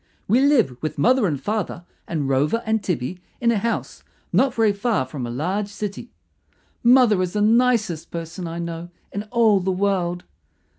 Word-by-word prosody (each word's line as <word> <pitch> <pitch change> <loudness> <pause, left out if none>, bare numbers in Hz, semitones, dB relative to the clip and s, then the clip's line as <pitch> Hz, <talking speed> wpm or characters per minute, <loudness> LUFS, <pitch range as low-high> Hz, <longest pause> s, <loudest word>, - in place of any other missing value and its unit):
We 235 +6 +4
live 245 - +3
with 155 - -3
mother 225 - +3
and 145 -5 -2
father 205 -1 -3 0.2
and 155 -5 -2
Rover 145 - +1
and 220 0 +1
Tibby 175 +1 -3 0.2
in 235 -1 +3
a 220 - +1
house 230 +3 -3 0.3
not 265 -2 +3
very 220 -2 +3
far 205 - 0
from 130 -2 -5
a - - -6
large 180 - -2
city. 205 +3 -6 0.7
Mother 240 -5 +5
is 180 -1 -2
the 210 - 0
nicest 220 -6 +2
person 170 +1 -6
I 165 +1 -5
know 170 0 -5 0.2
in 200 - -3
all 225 -4 +4
the 190 +1 -2
world. 180 -2 0
195 Hz, 170 wpm, -22 LUFS, 165-225 Hz, 0.7 s, Mother